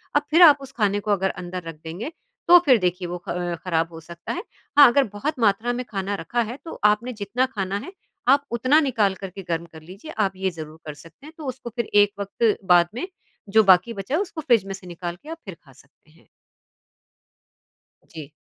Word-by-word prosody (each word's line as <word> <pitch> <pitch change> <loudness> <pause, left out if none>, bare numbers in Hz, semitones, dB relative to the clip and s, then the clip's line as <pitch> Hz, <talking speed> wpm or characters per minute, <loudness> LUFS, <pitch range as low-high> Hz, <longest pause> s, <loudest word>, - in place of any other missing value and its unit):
अब 290 - +5
फिर 335 - +5
आप 290 -1 +6
उस 265 -1 -10
खाने 205 -2 +1
को 210 0 -3
अगर 190 -1 +1
अंदर 180 0 -6
रख 165 - -6
देंगे 180 - -6 0.4
तो 355 +1 +9
फिर 260 -4 +6
देखिए 180 -2 -1
वो 175 - -4
ख - - -1 0.3
खराब 165 -2 0
हो 165 - -8
सकता 170 +6 -8
है। - - -5 0.3
हाँ, 290 -2 +10
अगर 275 +4 +4
बहुत 260 +8 -3
मात्रा 225 +2 +2
में 250 0 -4
खाना 200 0 -2
रखा 240 +8 -1
है 250 - -7
तो 325 - -8
आपने 235 +4 -3
जितना 250 +6 0
खाना 195 -1 -2
है, - - -9 0.4
आप 280 +2 +4
उतना 255 +6 +3
निकाल 210 -6 +2
कर 195 - -4
के 195 +2 -9
गर्म 165 0 -1
कर 160 - -11
लीजिए। 195 - -11
आप 195 - 0
ये 190 0 -1
ज़रूर 155 +1 -9
कर 150 - -6
सकते 165 - -16
हैं 315 - -12
तो 305 - -8
उसको 255 -2 -6
फिर 235 -3 -1 0.2
एक 205 - -1
वक़्त 205 +2 0 0.2
बाद 175 -1 +5
में 360 +9 -4 0.4
जो 220 +2 +5
बाकी 190 +4 +5
बचा 200 +7 -3
है 360 - +1
उसको 350 -5 -5
फ्रिज 235 -8 +3
में 195 - -5
से 190 -1 -10
निकाल 175 0 -6
के 305 - -11
आप 330 - -6
फिर 190 - -8
खा 135 - -18
सकते 140 +3 -24
हैं। 165 - -25 1.8
जी। 155 -4 -9
200 Hz, 225 wpm, -23 LUFS, 175-250 Hz, 1.8 s, हाँ